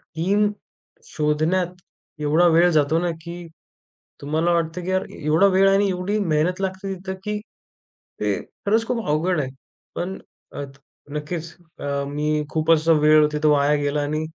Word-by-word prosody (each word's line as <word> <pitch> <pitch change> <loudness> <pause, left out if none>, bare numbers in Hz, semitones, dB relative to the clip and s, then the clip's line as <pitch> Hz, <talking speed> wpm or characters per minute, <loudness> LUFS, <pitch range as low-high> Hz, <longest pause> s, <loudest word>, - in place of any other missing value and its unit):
Team 200 +6 +2 0.6
शोधण्यात 160 - 0 0.5
एवढा 155 +4 +4
वेळ 170 +1 +5
जातो, 155 +1 +2
ना, 175 0 0
की 170 0 -8 0.7
तुम्हाला 155 +4 0
वाटतं 170 +1 -1
की 185 - -3
यार, 185 0 0 0.2
एवढा 155 +6 +4
वेळ 195 0 +6
आणि 195 +1 +3
एवढी 190 +3 -1
मेहनत 180 0 0
लागते. 190 +1 -3
तिथं, 190 +1 -6
की 210 0 -2 0.8
ते - - +1 0.3
खरंच 220 +3 +2
खूप 235 -3 -2
अवघड 160 +3 +1
आहे, 130 - -4 0.5
पण 185 +2 -3 0.4
अ, - - -4 0.5
नक्कीच. 150 +3 -4 0.3
अ, - - -6 0.2
मी 150 +1 -1
खूप 155 0 -1
असा 165 0 +4
वेळ 155 0 +6
तिथं 150 0 +2
वाया 145 0 +3
गेला 145 +1 0
आणि 155 +2 -2
165 Hz, 150 wpm, -22 LUFS, 150-185 Hz, 0.8 s, वेळ